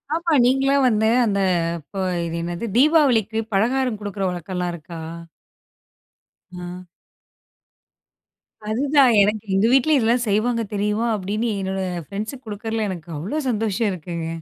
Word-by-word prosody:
ஆமா. 335 0 -1
நீங்களும் 270 +1 +3
வந்து 220 -1 +2 0.2
அந்த 200 -3 0 0.4
இப்ப 155 +6 -13 0.3
இது 170 0 -4
என்னது? 175 +5 -4
தீபாவளிக்கு 255 - +3
பலகாரம் 240 +2 +1
கொடுக்கிற 200 -1 -4
வழக்கல்லாம் 180 0 -3
இருக்கா? 170 0 -10 1.6
ஆ. 180 +1 -7 1.9
அதுதான். 270 +2 +4
எனக்கு 210 +1 +1
எங்க 195 +3 +3
வீட்லயும் 270 +2 +4
இதெல்லாம் 235 +2 +2
செய்வாங்க 230 +3 +1
தெரியுமா? 210 +3 0
அப்பிடின்னு 210 +3 -2
என்னோட 190 0 -2 0.3
ஃப்ரெண்ட்ஸுக்கு 215 +6 -6
குடுக்கறதுல 220 +1 -3
எனக்கு 175 -3 -7
அவ்ளோ 200 - -4
சந்தோஷம் 220 -1 0
இருக்குங்க. 170 -2 -5
215 Hz, 115 wpm, -22 LUFS, 190-245 Hz, 1.9 s, அதுதான்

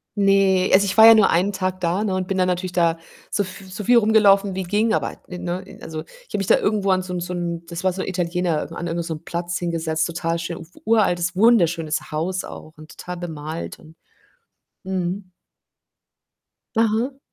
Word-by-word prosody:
ne, 195 -2 +3
also, 200 +1 +6
ich 190 - -2
war 220 - +10
ja 225 - +11
nur 215 -2 +5
1 185 +4 +2
Tag 185 -1 -2
da, 180 +4 0
ne, 195 -3 -1
und 185 -1 -2
bin 195 - -2
dann 185 - +3
natürlich 180 0 -2
da 170 -2 +2 0.3
so 205 - 0
f 185 +1 -9
so 195 +3 -6
viel 240 +4 +5
rumgelaufen 205 -3 +4
wie 190 - -2
ging, 210 +5 +1
aber - - -2
ne 180 -1 -7
ne 180 +1 -5
also, 155 -1 -6
ich - - -20
habe - - -2
mich 195 - -2
da - - +5
irgendwo 205 -2 0
an 185 0 +2
so 180 -1 -6
'n 180 - -2
so 180 +1 -4
'n 170 -1 -4
das 170 +1 -6
war 185 - +2
so 190 - -4
'n - - -4
Italiener, 175 -3 -1
an 175 - -4
irgend 170 0 -2
so 165 - -3
'nem 155 - -9
Platz 175 0 -3
hingesetzt, 165 -2 -1
total 170 0 -2
schön 170 0 -5
uf 165 - -11 0.2
uraltes, 180 -5 +2
wunderschönes 175 -10 +2
Haus 180 +5 -2
auch 155 - -10
und 155 +1 -14
total 180 0 -6
bemalt 160 -2 -6
und 160 0 -17 0.9
mhm. 185 0 -3 1.5
Aha. 230 +5 +1
180 Hz, 210 wpm, -22 LUFS, 170-195 Hz, 1.5 s, ja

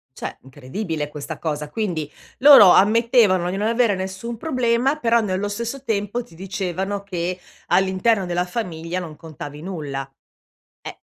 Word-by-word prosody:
Cioè - - -6
incredibile 145 +4 -5
questa 150 -1 -7
cosa. 150 -2 -3
Quindi 170 -7 -3 0.3
loro 270 -8 +9
ammettevano 210 -3 +4
di 190 - -3
non 210 +2 0
avere 230 -2 +2
nessun 190 +5 -5
problema, 255 0 +1
però 235 -4 +3
nello 200 -1 -2
stesso 235 +6 -4
tempo 215 +1 -1
ti 235 - -19
dicevano 195 +2 -3
che 180 -2 -3 0.3
all'interno 190 +2 +2
della 175 0 -1
famiglia 180 -4 -4
non 160 -4 -8
contavi 150 -2 -9
nulla. 145 -7 -5 0.7
Eh. - - -9
190 Hz, 140 wpm, -22 LUFS, 165-230 Hz, 0.7 s, loro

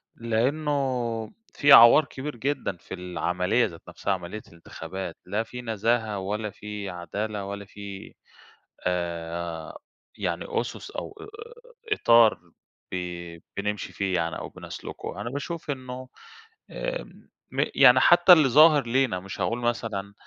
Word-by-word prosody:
لإنه 125 -1 -1 0.2
في 145 0 +3
عَوار 120 +5 +9
كبير 145 -1 -6
جدًا 125 -7 -2
في 90 - -11
العملية 90 +4 0
ذات 85 - -8
نفسها، 100 - -2
عملية 95 +4 -6
الانتخابات. 85 +1 -8
لا 105 +5 -1
في 125 +2 -8
نزاهة، 110 -2 0
ولا 105 +3 -3
في 105 0 -7
عدالة، 100 +4 -4
ولا 100 0 -6
في 100 -1 -9 0.7
آآ 85 -2 -3 0.4
يعني - - -2
أُسُس، 120 - -3
أو 405 - -6 0.8
إطار 115 - +5 0.5
ب - - -3 0.6
بنمشي 105 +1 -3
فيه 95 -2 -1
يعني، 85 -2 -1
أو - - -6
بنَسلُكه. 105 - -8
أنا 120 - -4
باشوف 150 +3 -4
إنه 130 -1 -7 0.6
آآ - - -3 0.5
م - - +1
يعني - - +8
حتّى 175 +1 +8
اللي 150 -6 +5
ظاهر 150 -1 +6
لينا، 125 -6 +1
مش 95 +1 -7
هاقول 120 +1 0
مثلًا 110 -4 -2
110 Hz, 125 wpm, -26 LUFS, 95-130 Hz, 0.8 s, عَوار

